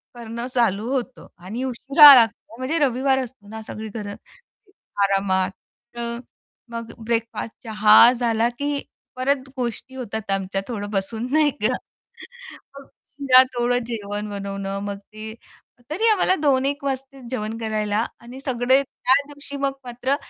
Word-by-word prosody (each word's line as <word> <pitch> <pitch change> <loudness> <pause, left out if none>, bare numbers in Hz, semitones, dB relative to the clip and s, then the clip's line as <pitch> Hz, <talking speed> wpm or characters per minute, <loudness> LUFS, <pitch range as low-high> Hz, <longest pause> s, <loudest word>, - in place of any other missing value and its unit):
करणं 235 0 -6
चालू 225 -2 +1
होतं 260 -1 -4 0.2
आणि 225 +7 -4
उशिरा 275 +3 +8
लागतो. 225 -2 +2
म्हणजे 260 +6 -2
रविवार 265 +1 +1
असतो 250 -5 -8
ना 220 +1 -7
सगळी 220 0 -7
घरं 205 -1 -6 0.9
आरामात 195 -1 +1 0.4
तर 235 0 -4 0.5
मग 230 0 -6
ब्रेकफास्ट, 230 0 -2
चहा 215 +1 +7
झाला, 230 -1 +1
की 285 +3 -3 0.3
परत 265 +1 -1
गोष्टी 250 +1 -4
होतात 220 -5 -5
आमच्या 195 0 -1
थोडं 205 -4 -4
बसून 220 +4 -2
नाही 305 -1 +4
का? 245 +4 +2 1.0
मग 275 - -15 0.4
त्यात 255 0 +9
थोडं 245 +1 +1
जेवण 210 -2 -4
बनवणं 195 -1 -4
मग 200 -1 -4
ते 215 +2 -10 0.6
तरी 420 +9 +1
आम्हाला 375 -2 +3
2-1 280 -1 +1
वाजतेच 270 0 -4
जेवण 220 -2 -3
करायला. 215 0 -1 0.2
आणि 245 +3 -10
सगळे 260 +1 +3
त्या 260 -1 0
दिवशी 285 -1 -8
मग 275 0 0
मात्र 245 +3 -1
235 Hz, 135 wpm, -22 LUFS, 215-260 Hz, 1.0 s, त्यात